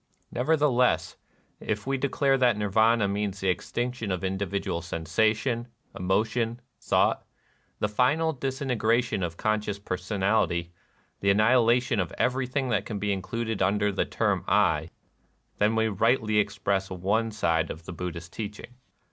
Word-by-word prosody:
Nevertheless, 130 Hz, -2 st, +2 dB, 0.4 s
if 105 Hz, -2 st, -3 dB
we 135 Hz, +1 st, 0 dB
declare 135 Hz, 0 st, +1 dB
that 125 Hz, -4 st, +3 dB
Nirvana 110 Hz, +1 st, +3 dB
means 100 Hz, 0 st, -2 dB
the 95 Hz, -, 0 dB
extinction 120 Hz, +3 st, -2 dB
of 95 Hz, 0 st, -2 dB
individual 95 Hz, -2 st, -2 dB
sensation, 110 Hz, -, 0 dB, 0.3 s
emotion, 110 Hz, +5 st, 0 dB, 0.2 s
thought, -, -, +2 dB, 0.3 s
— -, -, -41 dB
the -, -, +2 dB
final 140 Hz, +9 st, +2 dB
disintegration 125 Hz, -5 st, 0 dB
of 85 Hz, -2 st, -3 dB
conscious 105 Hz, -1 st, -1 dB
personality, 90 Hz, -2 st, -1 dB, 0.2 s
— -, -, -39 dB
the 100 Hz, -, +2 dB
annihilation 115 Hz, +2 st, +3 dB
of 90 Hz, -3 st, -1 dB
everything 130 Hz, +1 st, 0 dB
that 105 Hz, -4 st, +1 dB
can 105 Hz, -1 st, -5 dB
be 100 Hz, 0 st, 0 dB
included 110 Hz, +2 st, -3 dB
under 105 Hz, +2 st, +2 dB
the -, -, 0 dB
term -, -, 0 dB
"I," -, -, +2 dB, 0.3 s
— -, -, -42 dB
then 105 Hz, +2 st, +3 dB
we 110 Hz, 0 st, +2 dB
rightly 110 Hz, +1 st, +2 dB
express 100 Hz, -2 st, 0 dB
one 100 Hz, +5 st, 0 dB
side 85 Hz, -6 st, 0 dB
of 80 Hz, -, -7 dB
the 90 Hz, -, -6 dB
Buddhist 85 Hz, -1 st, -6 dB
teaching. 110 Hz, +3 st, -7 dB
105 Hz, 140 wpm, -27 LUFS, 95-120 Hz, 0.4 s, that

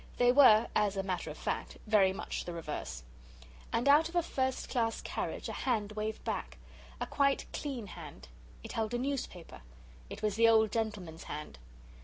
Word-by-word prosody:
They 245 Hz, 0 st, +5 dB
were, 240 Hz, -5 st, +7 dB
as 205 Hz, -2 st, +2 dB
a 195 Hz, -, 0 dB
matter 185 Hz, -2 st, -3 dB
of -, -, -7 dB
fact, -, -, -3 dB
very 210 Hz, -3 st, +4 dB
much 190 Hz, -, -4 dB
the 175 Hz, -, -5 dB
reverse. 150 Hz, -, -5 dB, 0.7 s
And 240 Hz, +4 st, 0 dB
out 300 Hz, +3 st, +6 dB
of 345 Hz, -, -11 dB
a 345 Hz, -, +3 dB
first 260 Hz, -4 st, -1 dB
class 230 Hz, -3 st, 0 dB
carriage -, -, -4 dB
a -, -, -4 dB
hand 215 Hz, -5 st, -1 dB
waved 215 Hz, +1 st, -4 dB
back. -, -, -3 dB, 0.4 s
A -, -, -1 dB
quite 275 Hz, -1 st, +1 dB
clean 265 Hz, -7 st, -4 dB
hand. 155 Hz, -, -10 dB, 0.4 s
It -, -, -7 dB
held 225 Hz, +1 st, -1 dB
a -, -, +1 dB
newspaper. 245 Hz, -, -4 dB, 0.5 s
It -, -, -8 dB
was 210 Hz, -1 st, 0 dB
the 230 Hz, 0 st, +6 dB
old 220 Hz, -2 st, +5 dB
gentleman's 205 Hz, -8 st, -3 dB
hand. 150 Hz, -, -7 dB
220 Hz, 180 wpm, -32 LUFS, 190-250 Hz, 0.7 s, were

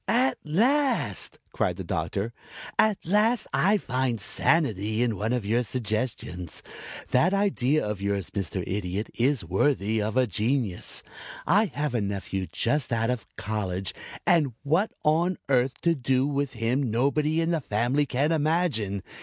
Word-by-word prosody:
"At 255 Hz, +3 st, +2 dB
last!" 255 Hz, -, +1 dB, 0.2 s
cried -, -, 0 dB
the -, -, -6 dB
Doctor. -, -, -2 dB, 0.5 s
"At 215 Hz, -2 st, +4 dB
last 215 Hz, +5 st, +3 dB
I 205 Hz, +4 st, +4 dB
find 125 Hz, -, -1 dB
sanity 110 Hz, -, +1 dB
in 115 Hz, -3 st, 0 dB
one 105 Hz, +4 st, -2 dB
of 125 Hz, -4 st, -1 dB
your 115 Hz, +4 st, +2 dB
suggestions. 110 Hz, -6 st, -3 dB, 0.5 s
That 175 Hz, +10 st, +4 dB
idea 155 Hz, -, +2 dB
of 105 Hz, -2 st, -3 dB
yours, 100 Hz, -1 st, -1 dB
Mr. 95 Hz, -2 st, -3 dB
Idiot, 100 Hz, +1 st, -3 dB
is 130 Hz, -, +1 dB
worthy 110 Hz, -, +1 dB
of 110 Hz, +3 st, -2 dB
a 130 Hz, -, +5 dB
genius. 110 Hz, -1 st, -1 dB, 0.4 s
I 205 Hz, +7 st, +4 dB
have 150 Hz, -, -3 dB
a 120 Hz, -, +1 dB
nephew 100 Hz, -1 st, -3 dB
just 125 Hz, 0 st, 0 dB
out 115 Hz, +1 st, +1 dB
of 125 Hz, -3 st, -4 dB
college 95 Hz, -3 st, -3 dB, 0.3 s
and 155 Hz, -7 st, +3 dB
what 165 Hz, +9 st, +2 dB
on 165 Hz, +4 st, +2 dB
earth 130 Hz, -1 st, +2 dB
to 170 Hz, -, +3 dB
do 130 Hz, -2 st, +1 dB
with 140 Hz, -1 st, -1 dB
him 120 Hz, +3 st, 0 dB
nobody 145 Hz, +7 st, +1 dB
in 165 Hz, +1 st, +1 dB
the 165 Hz, -2 st, 0 dB
family 125 Hz, +6 st, +1 dB
can 140 Hz, +5 st, +1 dB
imagine. 150 Hz, -, +1 dB
125 Hz, 150 wpm, -26 LUFS, 105-155 Hz, 0.5 s, a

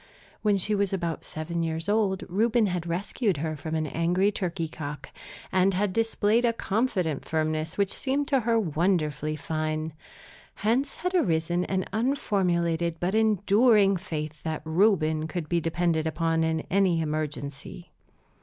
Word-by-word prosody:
When 210 Hz, -2 st, +3 dB
she 210 Hz, +3 st, 0 dB
was 200 Hz, -2 st, +1 dB
about 170 Hz, -4 st, -2 dB
seven 165 Hz, +2 st, -4 dB
years 165 Hz, +1 st, -2 dB
old 205 Hz, -2 st, +1 dB
Reuben 220 Hz, +5 st, +2 dB
had 180 Hz, -3 st, -2 dB
rescued 190 Hz, -, -1 dB
her 155 Hz, +2 st, -2 dB
from 160 Hz, +2 st, -4 dB
an 155 Hz, -1 st, 0 dB
angry 175 Hz, +6 st, +1 dB
turkey 175 Hz, -4 st, -2 dB
cock, 150 Hz, -2 st, -7 dB, 0.4 s
and 190 Hz, 0 st, +3 dB
had 195 Hz, 0 st, 0 dB
displayed 225 Hz, +1 st, +2 dB
a 235 Hz, -1 st, +3 dB
confident 195 Hz, -, -1 dB
firmness 155 Hz, 0 st, -2 dB
which 200 Hz, -1 st, +1 dB
seemed 280 Hz, +1 st, -1 dB
to 270 Hz, -, +3 dB
her 230 Hz, -1 st, +2 dB
wonderfully 155 Hz, -4 st, 0 dB
fine. 155 Hz, +1 st, -3 dB, 0.6 s
Hence 245 Hz, +7 st, 0 dB
had 360 Hz, +2 st, -2 dB
arisen 175 Hz, -, +1 dB
an 190 Hz, -1 st, -1 dB
unformulated 175 Hz, -, 0 dB
but 180 Hz, +2 st, -1 dB
enduring 210 Hz, -1 st, +4 dB
faith 155 Hz, -4 st, -5 dB
that 160 Hz, -2 st, -4 dB
Reuben 160 Hz, -3 st, +2 dB
could 160 Hz, 0 st, -4 dB
be 170 Hz, +1 st, +1 dB
depended 165 Hz, -1 st, 0 dB
upon 165 Hz, 0 st, 0 dB
in 160 Hz, 0 st, 0 dB
any 190 Hz, -3 st, +3 dB
emergency. 155 Hz, +2 st, -4 dB
175 Hz, 145 wpm, -27 LUFS, 160-205 Hz, 0.6 s, enduring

